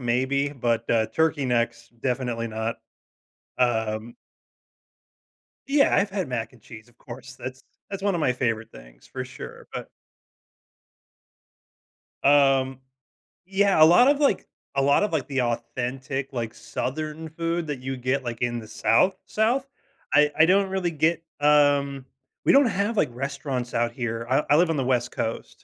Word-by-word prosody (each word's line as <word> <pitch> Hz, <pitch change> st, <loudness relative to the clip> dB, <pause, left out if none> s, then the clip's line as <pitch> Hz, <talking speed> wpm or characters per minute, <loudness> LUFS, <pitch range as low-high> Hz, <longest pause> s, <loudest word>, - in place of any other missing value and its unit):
maybe, 130 Hz, +3 st, 0 dB
but, 120 Hz, -5 st, -1 dB
uh, 110 Hz, -1 st, +3 dB
turkey 155 Hz, +4 st, 0 dB
necks, 115 Hz, -1 st, -1 dB
definitely 125 Hz, -3 st, -1 dB
not, 110 Hz, +1 st, -3 dB, 0.8 s
um 110 Hz, -2 st, 0 dB, 1.5 s
Yeah. 280 Hz, 0 st, +3 dB
I've 200 Hz, 0 st, +2 dB
had 190 Hz, -7 st, -3 dB
mac 120 Hz, -1 st, -3 dB
and 120 Hz, -4 st, -20 dB
cheese, 110 Hz, 0 st, -12 dB
of 120 Hz, -, -25 dB
course. 130 Hz, +1 st, -10 dB
That's 130 Hz, +1 st, -8 dB, 0.3 s
that's 195 Hz, -1 st, -5 dB
one 200 Hz, -1 st, +1 dB
of 170 Hz, -, -1 dB
my 130 Hz, -4 st, +2 dB
favorite 115 Hz, -3 st, -2 dB
things, -, -, -16 dB
for -, -, -5 dB
sure, -, -, -10 dB
but -, -, -6 dB, 2.3 s
Um, 135 Hz, -2 st, +4 dB, 0.7 s
yeah, 195 Hz, -4 st, +3 dB
a -, -, +11 dB
lot 175 Hz, +11 st, +7 dB
of, 290 Hz, +1 st, +3 dB
like 285 Hz, -, +2 dB, 0.3 s
a 135 Hz, -, +2 dB
lot 140 Hz, +6 st, +4 dB
of, 210 Hz, -4 st, 0 dB
like, 140 Hz, -5 st, -1 dB
the 135 Hz, -3 st, 0 dB
authentic, 125 Hz, +3 st, -3 dB
like, 115 Hz, -3 st, -4 dB
southern 155 Hz, +4 st, -4 dB
food 165 Hz, +1 st, -2 dB
that 145 Hz, -4 st, -4 dB
you 130 Hz, +1 st, -4 dB
get, 130 Hz, +2 st, -1 dB
like, 120 Hz, -1 st, -5 dB
in 120 Hz, -1 st, -1 dB
the 110 Hz, -, -8 dB
South, 185 Hz, +12 st, +3 dB
South. 240 Hz, +5 st, +1 dB, 0.5 s
I 150 Hz, 0 st, +5 dB
I 160 Hz, -, +7 dB
don't 195 Hz, +1 st, +3 dB
really 190 Hz, -3 st, -1 dB
get, 165 Hz, +1 st, +1 dB, 0.2 s
um 145 Hz, -2 st, +3 dB, 0.4 s
we -, -, +5 dB
don't 280 Hz, 0 st, +6 dB
have, 210 Hz, +1 st, -1 dB
like, -, -, +3 dB
restaurants 135 Hz, -1 st, -4 dB
out 120 Hz, 0 st, +1 dB
here. 115 Hz, -1 st, -4 dB
I 135 Hz, +3 st, +3 dB
I 145 Hz, -, +6 dB
live 170 Hz, +1 st, +3 dB
on 160 Hz, -, 0 dB
the 135 Hz, -, 0 dB
West 125 Hz, -1 st, 0 dB
Coast. 115 Hz, -, -3 dB
135 Hz, 160 wpm, -25 LUFS, 120-160 Hz, 2.3 s, a